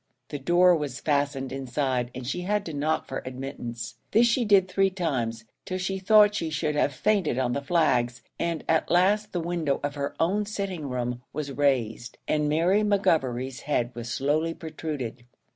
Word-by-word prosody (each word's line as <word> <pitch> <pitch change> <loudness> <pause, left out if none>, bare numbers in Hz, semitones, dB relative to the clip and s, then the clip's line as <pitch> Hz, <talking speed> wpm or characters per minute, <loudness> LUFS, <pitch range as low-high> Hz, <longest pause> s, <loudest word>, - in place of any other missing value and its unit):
The 145 - -4
door 175 +5 +5
was 145 -5 -3
fastened 140 -2 0
inside, 130 -2 -1
and 130 0 -6
she 160 +8 -2
had 205 +2 -1
to 160 - -5
knock 150 +2 0
for 135 - -5
admittance. 125 -3 -6
This 230 +2 +5
she 235 +1 +2
did 200 -3 +5
three 195 +1 +2
times, 125 -12 -2 0.2
till 185 - -3
she 190 +1 -2
thought 210 +1 +6
she 165 -5 -2
should 150 0 -1
have 145 -1 +2
fainted 185 - +1
on 125 -2 +1
the 140 - -1
flags, 125 -7 +1 0.2
and 170 -2 -1
at 160 -1 +2
last 200 +4 +3
the 175 - -2
window 165 -4 -1
of 145 0 -1
her 140 -1 -4
own 200 +5 +1
sitting 190 -8 -4
room 125 -1 -3
was 145 -1 -4
raised, 125 -5 0
and 150 -1 +1
Mary 170 +7 +3
McGovery's 135 - +1
head 125 -5 -1
was 120 0 -6
slowly 155 +6 0
protruded. 150 -7 -5
150 Hz, 175 wpm, -26 LUFS, 130-180 Hz, 0.2 s, thought